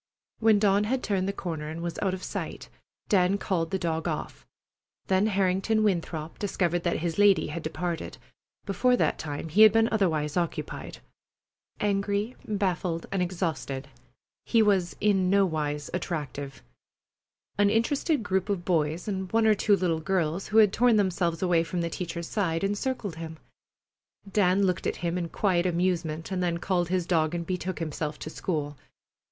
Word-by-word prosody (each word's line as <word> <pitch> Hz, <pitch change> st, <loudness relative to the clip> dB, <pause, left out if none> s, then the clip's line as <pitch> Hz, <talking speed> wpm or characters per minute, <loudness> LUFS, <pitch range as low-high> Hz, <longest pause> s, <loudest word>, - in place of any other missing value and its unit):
When 220 Hz, -2 st, +5 dB
Dawn 200 Hz, 0 st, +3 dB
had 255 Hz, +4 st, -1 dB
turned 195 Hz, -3 st, 0 dB
the -, -, +1 dB
corner 160 Hz, -6 st, -5 dB
and 160 Hz, +1 st, -6 dB
was 170 Hz, -1 st, -4 dB
out 190 Hz, -2 st, +1 dB
of 185 Hz, -, -10 dB
sight, -, -, -5 dB, 0.4 s
Dan 190 Hz, 0 st, +3 dB
called 170 Hz, -5 st, -1 dB
the 190 Hz, -, 0 dB
dog 165 Hz, -2 st, -2 dB
off. -, -, -5 dB, 0.6 s
Then 190 Hz, +2 st, +2 dB
Harrington 195 Hz, +2 st, +1 dB
Winthrop 165 Hz, -5 st, -2 dB
discovered 175 Hz, -4 st, 0 dB
that 170 Hz, -2 st, -1 dB
his 170 Hz, +2 st, -2 dB
lady 205 Hz, -2 st, +5 dB
had 170 Hz, -, -4 dB
departed. 165 Hz, +2 st, -4 dB, 0.5 s
Before 245 Hz, +6 st, +2 dB
that -, -, +1 dB
time 150 Hz, +1 st, -5 dB
he 190 Hz, +8 st, +3 dB
had 215 Hz, -1 st, +10 dB
been 225 Hz, +1 st, +4 dB
otherwise 160 Hz, -9 st, +1 dB
occupied. 170 Hz, -2 st, -3 dB, 0.8 s
Angry, 205 Hz, +3 st, 0 dB
baffled, 185 Hz, -5 st, -1 dB
and 195 Hz, -, 0 dB
exhausted, 160 Hz, -7 st, -3 dB, 0.5 s
he 230 Hz, -2 st, +3 dB
was 190 Hz, -4 st, +2 dB
in 195 Hz, -3 st, +2 dB
nowise 155 Hz, -7 st, +1 dB
attractive. 145 Hz, -, -4 dB, 1.0 s
An 205 Hz, 0 st, +5 dB
interested 270 Hz, +5 st, +1 dB
group 190 Hz, 0 st, -1 dB
of 185 Hz, -4 st, -1 dB
boys 160 Hz, 0 st, 0 dB
and 190 Hz, -2 st, -3 dB
one 225 Hz, 0 st, +3 dB
or 220 Hz, -, +6 dB
two 205 Hz, 0 st, +3 dB
little 175 Hz, -4 st, 0 dB
girls 175 Hz, 0 st, -1 dB
who 215 Hz, -, 0 dB
had 210 Hz, -2 st, +6 dB
torn 240 Hz, -1 st, +4 dB
themselves 180 Hz, -4 st, +1 dB
away 175 Hz, -2 st, +3 dB
from 170 Hz, +2 st, -3 dB
the 170 Hz, 0 st, -2 dB
teacher's 170 Hz, -1 st, -4 dB
side 170 Hz, -5 st, -1 dB
encircled 205 Hz, -2 st, -2 dB
him. 160 Hz, -1 st, -7 dB, 1.0 s
Dan 195 Hz, -1 st, +3 dB
looked 185 Hz, -2 st, 0 dB
at -, -, -1 dB
him 170 Hz, 0 st, 0 dB
in 175 Hz, -2 st, -2 dB
quiet 185 Hz, -2 st, +1 dB
amusement, 170 Hz, -2 st, -1 dB
and 185 Hz, -1 st, -1 dB
then 175 Hz, -1 st, 0 dB
called 175 Hz, -1 st, 0 dB
his 180 Hz, -1 st, 0 dB
dog 165 Hz, -2 st, +1 dB
and 170 Hz, -1 st, -3 dB
betook 185 Hz, +1 st, -3 dB
himself 155 Hz, -2 st, -3 dB
to 155 Hz, -, -7 dB
school. 150 Hz, -5 st, -3 dB
180 Hz, 165 wpm, -27 LUFS, 165-200 Hz, 1.0 s, had